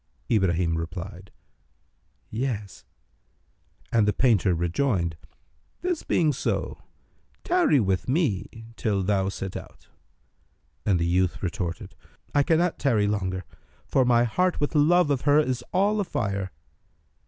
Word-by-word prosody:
Ibrahim 85 -6 +2
replied, 90 +3 -7 1.0
Yes; 110 -4 -4 1.1
and 110 -3 +3
the 105 - +3
painter 105 -8 +3
rejoined, 85 - 0 0.7
"This 355 -2 -1
being 155 -4 +2
so, 135 - -2 0.6
tarry 345 - +3
with 95 0 0
me 115 - -1
till 100 -4 0
thou 95 0 +1
set 95 -1 -6
out." - - -10 1.0
But 95 -3 +3
the 85 - 0
youth 90 +2 0
retorted, 90 -3 -4 0.4
"I 145 - +4
cannot 165 +4 +1
tarry 115 -7 +2
longer; 95 -3 -2 0.4
for 130 - +2
my 120 -1 +4
heart 180 +10 +1
with 145 - -1
love 155 +1 +4
of 135 -2 +1
her 145 0 +4
is 130 -5 0
all 205 +3 +2
afire." 100 - -2
110 Hz, 120 wpm, -26 LUFS, 95-145 Hz, 1.1 s, I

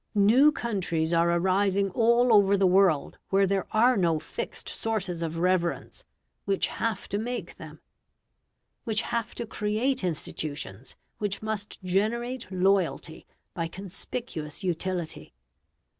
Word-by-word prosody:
New 235 +9 +6
countries 180 - -1
are 170 0 +3
arising 190 +3 +2
all 235 +2 +4
over 200 -1 +5
the 195 - +3
world 185 -5 +3
where 195 0 +4
there 195 0 0
are 245 +4 +4
no 170 -5 +2
fixed 155 - -6
sources 195 -6 -2
of 165 0 -3
reverence; 180 - -1 0.4
which 195 -1 +1
have 230 -1 -3
to 205 - -2
make 245 +2 -5
them; - - -11 1.0
which 220 0 0
have 230 -1 -3
to 235 - -4
create 220 +4 -1
institutions 145 - -4 0.2
which 205 0 -1
must 215 -1 -4
generate 225 +5 -1
loyalty 185 -3 0 0.3
by 165 -2 -2
conspicuous 190 -2 -6
utility. 175 - -2
195 Hz, 125 wpm, -27 LUFS, 170-220 Hz, 1.0 s, New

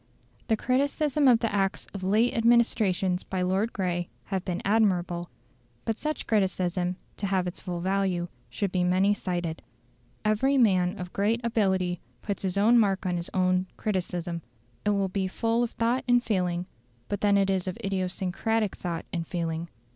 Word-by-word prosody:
The 220 - +2
criticism 280 +3 +1
of 240 -3 +6
the 230 -3 0
Acts 195 -1 0
of 195 - -5
late 215 +7 +2
administrations 220 -6 +2
by 185 -1 -2
Lord 195 +5 +1
Grey 175 -3 -2
has 190 -2 -2
been 180 -1 -3
admirable. 180 -5 +1 0.6
But 225 -1 -1
such 305 0 -3
criticism, 185 -3 0 0.2
to 200 - -2
have 190 -2 +1
its 180 - -4
full 175 -1 -4
value, 190 -2 0 0.2
should 200 -3 -2
be 180 -1 +1
many 185 +3 +3
sided. 175 -5 -3 0.6
Every 260 +6 +3
man 190 -5 +3
of 180 -1 -7
great 215 +4 +1
ability 190 -6 +1 0.2
puts 200 -3 -3
his 190 -1 -2
own 230 +4 +6
mark 200 -3 +2
on 180 -1 0
his 170 - -5
own 185 0 +2
criticism; 175 -4 -2 0.4
it - - +3
will 200 -1 +2
be 190 0 -1
full 230 +5 0
of 240 - +1
thought 235 +3 0
and 245 0 +4
feeling, 180 -5 0 0.4
but 205 - -3
then 205 -1 +4
it 195 -1 +3
is 190 -1 0
of 185 - -3
idiosyncratic 195 +3 -1
thought 170 -2 -4
and 165 -2 -2
feeling. 165 -1 -3
190 Hz, 170 wpm, -27 LUFS, 180-220 Hz, 0.6 s, of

